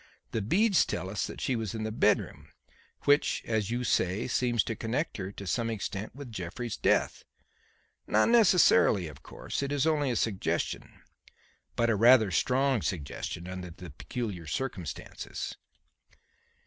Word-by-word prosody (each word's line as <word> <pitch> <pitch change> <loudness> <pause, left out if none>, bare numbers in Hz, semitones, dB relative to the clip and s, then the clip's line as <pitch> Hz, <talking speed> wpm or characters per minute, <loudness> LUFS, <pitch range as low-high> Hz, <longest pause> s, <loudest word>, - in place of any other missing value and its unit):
The 115 - -1
beads 195 - +3
tell 95 - -4
us 105 - -2
that - - -8
she 130 - 0
was 115 -1 -3
in 110 - -3
the 110 - -2
bedroom; 110 - +1 0.6
which, 145 +1 +3
as 110 -3 -1
you 120 +1 -1
say, 95 -1 +1
seems 120 -2 +1
to 115 - -3
connect 120 +10 -2
her 95 -1 -5
to 100 - -8
some 115 +4 -1
extent 105 -1 -4
with 140 -3 -9
Jeffrey's 100 +4 -5
death. - - +1 0.8
Not 110 - +3
necessarily, 180 - +5
of 75 -1 -11
course. - - -5
It 140 0 -2
is 145 0 +1
only 150 -3 +2
a 120 - 0
suggestion; 105 -5 -2 0.7
but 115 0 +2
a - - +2
rather 115 -1 +6
strong 130 +6 +2
suggestion 85 +1 -4
under 90 -1 -6
the 85 0 -10
peculiar 95 - -5
circumstances." 90 - -5
110 Hz, 150 wpm, -29 LUFS, 95-130 Hz, 0.8 s, rather